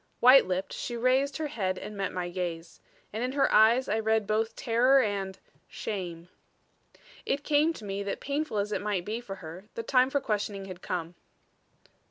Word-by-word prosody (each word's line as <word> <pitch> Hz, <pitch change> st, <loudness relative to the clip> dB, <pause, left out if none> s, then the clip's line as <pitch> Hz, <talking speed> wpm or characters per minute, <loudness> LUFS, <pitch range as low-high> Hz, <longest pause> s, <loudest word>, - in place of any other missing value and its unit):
White 255 Hz, -2 st, +8 dB
lipped, 185 Hz, +1 st, -2 dB
she 240 Hz, -, -4 dB
raised 260 Hz, +4 st, +2 dB
her 315 Hz, -, -2 dB
head 190 Hz, -10 st, -2 dB
and 210 Hz, -, -7 dB
met 195 Hz, -1 st, -2 dB
my 180 Hz, -1 st, -3 dB
gaze. 175 Hz, -2 st, -5 dB, 0.3 s
And 220 Hz, +3 st, -2 dB
in 255 Hz, +1 st, -2 dB
her 280 Hz, -, +2 dB
eyes 230 Hz, +4 st, +5 dB
I 220 Hz, -, +1 dB
read 220 Hz, -1 st, +1 dB
both 220 Hz, +2 st, 0 dB
terror 250 Hz, +3 st, +4 dB
and 195 Hz, -5 st, -1 dB, 0.3 s
shame. 175 Hz, -5 st, -5 dB, 1.0 s
It 285 Hz, +1 st, -1 dB
came 300 Hz, +2 st, +3 dB
to 220 Hz, -, -10 dB
me 195 Hz, 0 st, -3 dB
that 200 Hz, 0 st, -3 dB
painful 285 Hz, -4 st, -2 dB
as 205 Hz, +1 st, -1 dB
it -, -, -1 dB
might 200 Hz, -4 st, -1 dB
be 220 Hz, +3 st, -3 dB
for 195 Hz, -5 st, -7 dB
her 180 Hz, +1 st, -10 dB
the 230 Hz, -, -3 dB
time 255 Hz, +1 st, +3 dB
for 285 Hz, -, +1 dB
questioning 205 Hz, -4 st, -2 dB
had 185 Hz, -1 st, -9 dB
come. 170 Hz, -2 st, -4 dB
215 Hz, 190 wpm, -29 LUFS, 190-255 Hz, 1.0 s, White